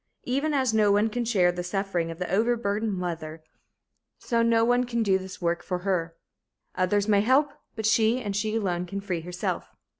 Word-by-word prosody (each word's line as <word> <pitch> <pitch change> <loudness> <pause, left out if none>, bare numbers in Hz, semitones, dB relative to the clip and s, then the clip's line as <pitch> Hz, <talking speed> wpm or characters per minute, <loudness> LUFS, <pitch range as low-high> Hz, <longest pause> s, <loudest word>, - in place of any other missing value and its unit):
Even 280 +5 0
as 260 -5 +1
no 210 -2 +4
one 205 +2 +3
can 245 +2 -1
share 190 -6 +3
the 175 0 -4
suffering 180 -2 -2
of 165 - -6
the 180 0 -3
overburdened 220 -1 +1
mother, 165 -3 -5 0.7
so 235 -2 0
no 230 0 +3
one 245 +1 +3
can 235 -2 -1
do 190 -2 +2
this 185 0 -9
work 170 -1 0
for 180 - -3
her. 170 -4 -1 0.6
Others 200 +3 +1
may 205 -2 +4
help, 270 +6 +3 0.2
but 220 -1 -4
she 225 +2 +3
and 205 -5 -4
she 215 +1 -1
alone 180 -5 -1
can 200 +3 -4
free 185 -4 -3
herself. 180 +2 -4
205 Hz, 190 wpm, -26 LUFS, 180-230 Hz, 0.7 s, no